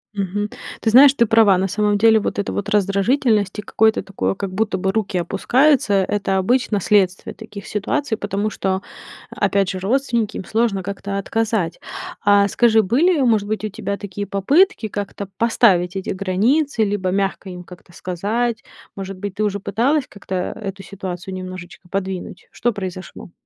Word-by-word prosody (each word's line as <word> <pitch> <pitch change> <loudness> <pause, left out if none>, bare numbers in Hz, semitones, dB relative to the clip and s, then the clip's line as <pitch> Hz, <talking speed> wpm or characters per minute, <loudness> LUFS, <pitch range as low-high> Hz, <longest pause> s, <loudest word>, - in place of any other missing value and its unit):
Мгм. 200 +1 -2 0.3
Ты 225 - 0
знаешь, 265 +3 +8
ты 235 - +4
права. 220 -4 +5
На 190 +1 0
самом 205 +1 +1
деле 220 +1 +5
вот - - -3
эта 200 - -2
вот 205 0 -3
раздражительность 205 +1 +1
и - - -3
какое-то 220 +1 +2
такое, 195 0 -2
как 195 -1 -4
будто 205 -1 0
бы 190 +1 0
руки 210 -2 -1
опускаются,- 250 - +2
это 200 -2 0
обычно 225 +2 +1
следствие 190 -1 +1
таких 210 -2 -10
ситуаций, 220 +5 -1
потому 205 0 -2
что, 190 -1 -2 0.5
опять 195 -2 +1
же, 185 - -5
родственники, 235 +1 0
им - - -6
сложно 215 -3 0
как-то 200 +1 -4
отказать. 215 -3 -1 0.4
А 205 -1 +5
скажи, 225 +1 +3
были, 295 - +2
может 220 -5 +2
быть, 215 0 -2
у - - -2
тебя 200 0 -4
такие 205 0 -6
попытки 255 - +2
как-то 205 -1 -5
поставить 195 -6 +3
эти 190 - -4
границы 220 +8 +1
либо 200 -3 -1
мягко 195 0 -1
им 180 -1 -8
как-то 180 0 -15
сказать? 210 +7 -2 0.3
Может 195 -1 -6
быть, 200 0 -6
ты 215 - -1
уже 200 -1 -1
пыталась 255 +9 +1
как-то 195 -2 -7
эту 195 +1 -4
ситуацию 190 -1 -6
немножечко 185 -1 -8
подвинуть? 190 -1 -5
Что 240 - 0
произошло? 185 -3 -7
200 Hz, 165 wpm, -20 LUFS, 190-225 Hz, 0.5 s, знаешь